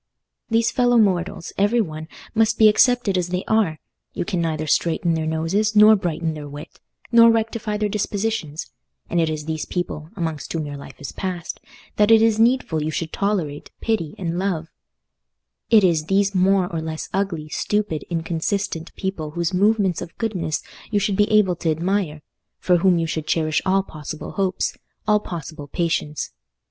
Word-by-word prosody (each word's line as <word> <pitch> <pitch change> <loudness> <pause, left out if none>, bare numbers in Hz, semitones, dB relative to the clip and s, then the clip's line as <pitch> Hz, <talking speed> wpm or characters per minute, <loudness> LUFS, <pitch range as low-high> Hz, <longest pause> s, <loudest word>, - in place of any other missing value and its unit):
These 230 0 +2
fellow 245 -1 +3
mortals, 185 -5 +1
every 205 +4 +3
one, 155 -6 -3 0.3
must 225 0 +2
be 220 - +7
accepted 220 -3 +3
as 180 - -1
they 180 +1 -2
are: 205 -9 +2 0.4
you - - -2
can 185 -3 -1
neither 155 -2 -1
straighten 165 +2 +1
their 160 -1 -1
noses, 175 +7 0
nor 215 +1 +8
brighten 170 -4 -2
their 150 -1 -7
wit, 145 +1 -10 0.3
nor 230 -1 +8
rectify 225 -1 0
their 210 0 0
dispositions; 205 -5 -2 0.4
and 170 - +2
it 160 - +1
is 155 -1 -4
these 155 -1 -3
people—amongst 165 -2 -4
whom 160 -2 -2
your 145 -1 -6
life 140 - -11
is 145 - -6
passed—that 185 +3 -3
it 225 -1 +8
is 225 -1 +3
needful 230 -9 +2
you 155 - -1
should 160 +1 -3
tolerate, 180 -8 -2
pity, 210 -9 -1
and 175 -1 -2
love: 175 -4 -2 1.0
it 220 -3 +6
is 165 -4 +3
these 195 +2 +2
more 190 0 +3
or 165 - -1
less 160 0 -5
ugly, 185 -6 -1
stupid, 205 -3 -1
inconsistent 170 +1 -2
people 190 -6 -3
whose 170 +3 -2
movements 200 -2 +2
of 165 - -8
goodness 190 -9 -2 0.3
you 210 - 0
should 200 0 0
be 210 +2 +3
able 210 -4 +4
to 165 - -2
admire—for 175 0 -1
whom 180 0 +4
you 165 - 0
should 160 -1 -3
cherish 155 -2 +1
all 195 +1 +3
possible 155 -3 -7
hopes, 190 -2 -1 0.3
all 210 0 +4
possible 155 -6 -7
patience. 160 -1 -2
180 Hz, 165 wpm, -22 LUFS, 160-210 Hz, 1.0 s, nor